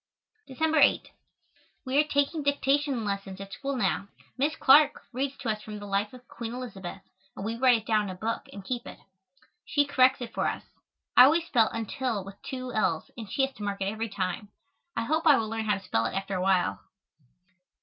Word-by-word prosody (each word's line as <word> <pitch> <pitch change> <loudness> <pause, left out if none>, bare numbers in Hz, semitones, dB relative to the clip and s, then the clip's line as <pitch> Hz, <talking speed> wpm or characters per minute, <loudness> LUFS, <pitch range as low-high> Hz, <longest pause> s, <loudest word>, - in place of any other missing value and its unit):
December 315 +4 +1
8. - - +4 0.7
We 260 +2 +2
are - - +6
taking 285 +2 +1
dictation 280 -3 +1
lessons 195 -1 -4
at 195 0 -8
school 275 +3 -3
now. 200 -3 0 0.3
Miss 290 +4 0
Clark 290 +2 +5
reads 270 +2 -2
to 240 - -4
us 215 -1 -1
from 215 -1 -8
the 205 - -8
"Life 200 +1 -1
of 250 -1 -14
Queen 230 0 -6
Elizabeth" 195 -7 -7 0.3
and 195 - -6
we 225 +1 -2
write 250 0 +5
it 220 - -9
down 215 -2 +2
in - - -5
a 185 - -5
book 225 +5 -3
and 200 -1 -10
keep 245 +1 -4
it. - - -9 0.7
She 290 -1 +1
corrects 260 -2 +4
it 245 - -7
for - - 0
us. - - -3 0.5
I 250 - +10
always 325 +4 +3
spell 230 -8 +3
"until" 225 -1 -3
with 195 0 -11
two 255 -2 -6
l's 165 -8 0
and 220 -5 -8
she 270 - +2
has 270 - -9
to 210 - -7
mark 200 -1 -3
it 195 +1 0
every 225 +1 -3
time. 195 +1 -3 0.5
I 230 - +1
hope 315 +7 0
I 290 -3 +8
will 225 - -1
learn 225 0 -3
how 210 -1 +2
to 195 - -8
spell 115 -11 0
it - - -6
after 195 0 -3
a 185 - -1
while. 185 -1 +2
230 Hz, 215 wpm, -28 LUFS, 200-270 Hz, 0.7 s, I